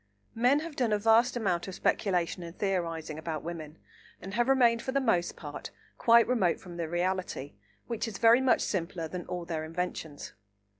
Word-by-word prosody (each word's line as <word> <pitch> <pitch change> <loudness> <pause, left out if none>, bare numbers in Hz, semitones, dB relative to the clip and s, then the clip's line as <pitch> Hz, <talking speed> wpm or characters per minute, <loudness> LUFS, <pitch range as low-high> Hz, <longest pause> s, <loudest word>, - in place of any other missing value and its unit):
Men 250 +6 +3
have 325 -2 -7
done 245 -5 +1
a - - +3
vast 225 +4 +4
amount 180 -6 0
of 190 - -6
speculation 180 -4 0
and 170 +1 -9
theorising 165 -5 -2
about 160 -2 -4
women, 160 -2 -7 0.4
and 190 +2 -8
have 240 +4 +1
remained 240 -3 +4
for 260 - -3
the 275 - +2
most 200 -10 +1
part 145 -2 -7 0.3
quite 235 0 +6
remote 225 -9 +2
from 175 -2 -10
the 165 -2 -3
reality, 175 -5 -2 0.3
which 230 -1 -3
is 210 -3 -5
very 230 +3 +6
much 260 -2 +3
simpler 170 -3 -2
than 180 +2 -6
all 175 -1 -4
their 160 -2 -3
inventions. 165 -2 -5
185 Hz, 185 wpm, -29 LUFS, 170-230 Hz, 0.4 s, quite